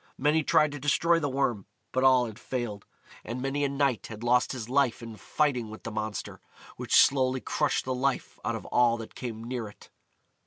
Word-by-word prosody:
Many 150 +3 +2
tried 150 0 +3
to 145 - -6
destroy 165 +4 +2
the 145 -3 -1
Worm, 130 -7 -1 0.2
but 130 - 0
all 130 -2 +5
had 110 0 -8
failed, 120 -7 -5 0.4
and 120 +3 -5
many 135 +2 -1
a 140 - +1
knight 140 -4 0
had 110 0 -9
lost 125 +1 +3
his 120 -5 -5
life 130 -2 +1
in 115 -1 -8
fighting 125 -2 -1
with 110 - -10
the 115 - -5
monster, 110 -2 -5 0.3
which - - -1
slowly 130 -1 +4
crushed 150 +3 -1
the 130 - -1
life 130 +1 -2
out - - -1
of - - -7
all 120 -1 +3
that 115 -1 -9
came 115 -3 -6
near 120 -2 -4
it. 105 - -16
125 Hz, 200 wpm, -28 LUFS, 115-140 Hz, 0.4 s, all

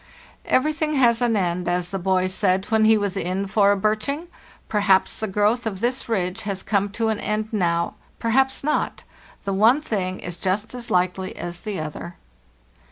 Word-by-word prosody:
" - - -28
Everything 305 +2 +1
has 240 -3 +4
an 235 -3 +2
end, 180 -2 -1
as 175 0 0
the 195 - -3
boy 185 0 +1
said 185 0 +1
when 220 0 +4
he 220 0 +6
was 205 -2 -2
in 190 +1 -1
for 200 +1 +3
a 205 - +2
birching. 220 - -1 0.4
Perhaps 200 -3 +2
the 220 - -2
growth 210 +4 +1
of 195 -4 -4
this 245 +3 -1
ridge 190 -1 -1
has 200 -2 -4
come 200 -1 +1
to 220 +2 -1
an 215 -1 -1
end 215 +1 -2
now, 170 -5 0 0.2
perhaps 265 +4 +1
not; 300 - -1 0.4
the 195 - -2
one 225 +8 +5
thing 190 -10 -3
is 175 0 -3
just 205 +5 -1
as 245 -1 -6
likely 185 -1 0
as 175 0 -6
the 210 -3 -4
other. 155 +3 -6
205 Hz, 185 wpm, -23 LUFS, 185-225 Hz, 0.4 s, he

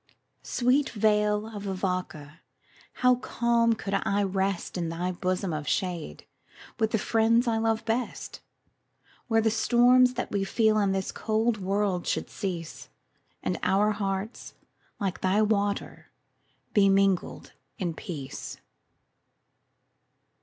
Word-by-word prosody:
Sweet 260 +3 +1
vale 210 -1 +2
of 205 0 -6
Avoca! 180 -5 -4 0.7
how 250 - +7
calm 235 -1 +1
could 200 -3 -5
I 200 +1 +1
rest 195 -1 -1
In 170 -2 -2
thy 175 +2 -2
bosom 185 0 -2
of 150 -1 -4
shade, 175 - -2 0.5
with 220 -1 +2
the 220 - +1
friends 230 +3 +2
I 225 -1 +2
love 225 0 0
best, 235 +2 -3 0.9
Where 225 -2 +3
the 220 0 +2
storms 245 +3 +4
that 250 - -3
we 200 -1 0
feel 215 +2 +2
in 200 -2 +2
this 190 0 -2
cold 220 +1 0
world 195 -1 -1
should - - -2
cease, 175 -5 -5 0.5
And 180 - -1
our 195 +3 +3
hearts, 200 +1 -4 0.4
like 195 -3 -2
thy 195 +3 +3
waters, 205 -1 -1 0.7
be 200 -2 +5
mingled 195 -2 +1 0.2
in 175 -3 -2
peace. 150 -7 -7
200 Hz, 125 wpm, -27 LUFS, 185-225 Hz, 0.9 s, how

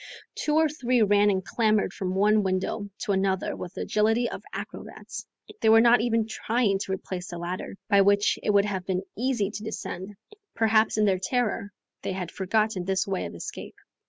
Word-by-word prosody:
Two 300 - -1
or 320 0 +5
three 250 -5 +1
ran 205 0 +4
and 190 -2 0
clambered 215 -2 +1
from 185 -1 -3
one 210 +2 +4
window 190 +2 -2
to 225 - -1
another 190 -1 0
with 180 0 -8
the - - -4
agility 225 +3 +2
of - - -6
acrobats. - - -8 0.3
They 220 - +4
were 225 0 +8
not 235 0 +6
even 230 -1 +1
trying 220 -2 0
to 195 - -4
replace 185 -1 -4
the 175 - -6
ladder, 175 +3 -5
by 200 -2 +5
which 200 +1 +3
it - - -2
would 200 -1 +4
have 195 -3 -3
been 185 0 -1
easy 235 -4 0
to 210 0 -7
descend; 205 -2 -6 0.4
perhaps 220 -1 +3
in 215 - +4
their 190 -2 +2
terror 210 -1 -1 0.3
they - - -3
had 180 -3 -4
forgotten 205 0 0
this 190 0 0
way 195 -2 -2
of - - -10
escape. - - -7
205 Hz, 190 wpm, -26 LUFS, 190-225 Hz, 0.4 s, were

